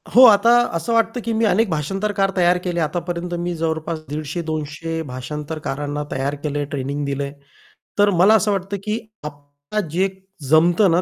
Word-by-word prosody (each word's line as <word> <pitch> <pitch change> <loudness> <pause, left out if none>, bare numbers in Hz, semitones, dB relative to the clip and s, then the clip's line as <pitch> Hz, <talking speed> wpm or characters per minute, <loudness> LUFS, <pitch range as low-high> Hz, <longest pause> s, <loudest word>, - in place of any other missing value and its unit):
हो, 250 - +9
आता 220 0 +6 0.2
असं 165 +7 -1
वाटतं, 230 +1 +2
की 230 - -1
मी 225 +1 +2
अनेक 215 +2 +2
भाषांतरकार 195 +5 -1
तयार 180 -1 +4
केले. 175 -2 -2
आतापर्यंत 175 +2 -2
मी 175 0 -2
जवळपास 160 0 -2
150-200 155 +1 -4
भाषांतरकारांना 145 +2 -4
तयार 140 +2 -1
केलंय 145 -1 -1
ट्रेनिंग 140 +1 -3
दिलंय. 140 0 -3 0.7
तर 205 0 +6
मला 200 +4 +7
असं 215 -1 +2
वाटतं, 195 0 -2
की 215 +2 -1 0.2
आपल्याला 145 +6 -6
जे 180 +5 +1 0.4
जमतं 175 +5 +5
ना 170 +2 +3
165 Hz, 155 wpm, -21 LUFS, 150-195 Hz, 0.7 s, हो